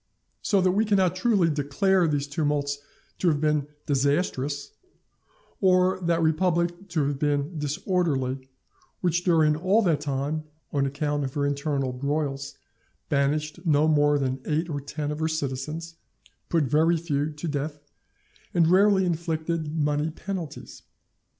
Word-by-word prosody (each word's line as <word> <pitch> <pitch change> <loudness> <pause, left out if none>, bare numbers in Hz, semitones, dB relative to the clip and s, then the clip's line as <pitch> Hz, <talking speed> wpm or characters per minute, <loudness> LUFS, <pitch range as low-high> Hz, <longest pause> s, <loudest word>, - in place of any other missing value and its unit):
So 200 -3 +2
that 185 0 +3
we 205 +4 +2
cannot 190 -4 +2
truly 190 -2 +3
declare 165 +5 +2
those 145 -2 0
tumults 145 -1 -1 0.4
to 185 - +1
have 150 -3 +3
been 150 -1 +1 0.2
disastrous, 145 0 0 0.9
or 185 -1 +3
that 170 -1 +1
republic 175 +3 +1
to 160 -5 0
have 140 -1 -2
been 145 +2 0
disorderly, 145 -5 -1 0.5
which 175 -1 +1
during 160 -4 +4
all 190 +8 +2
that 160 -6 +2
time, 145 +2 -2 0.3
on 140 -1 +2
account 145 +1 -1
of 135 -1 -4
her 145 -1 +1
internal 140 -2 -1
broils, 140 +1 -2 0.5
banished 150 +3 0
no 155 -3 +3
more 145 -1 +4
than 130 -1 -2
eight 160 +2 -1
or 145 -1 -3
ten 145 +1 -4
of 150 - -4
her 160 - +1
citizens, 155 +2 -4 0.5
put 165 -3 +2
very 155 +5 +3
few 150 -3 -1
to 150 +3 -6
death, 150 0 -3 0.8
and 165 -2 +4
rarely 195 0 +5
inflicted 165 -2 -2
money 150 0 0
penalties. 175 -1 -6
155 Hz, 140 wpm, -26 LUFS, 145-170 Hz, 0.9 s, rarely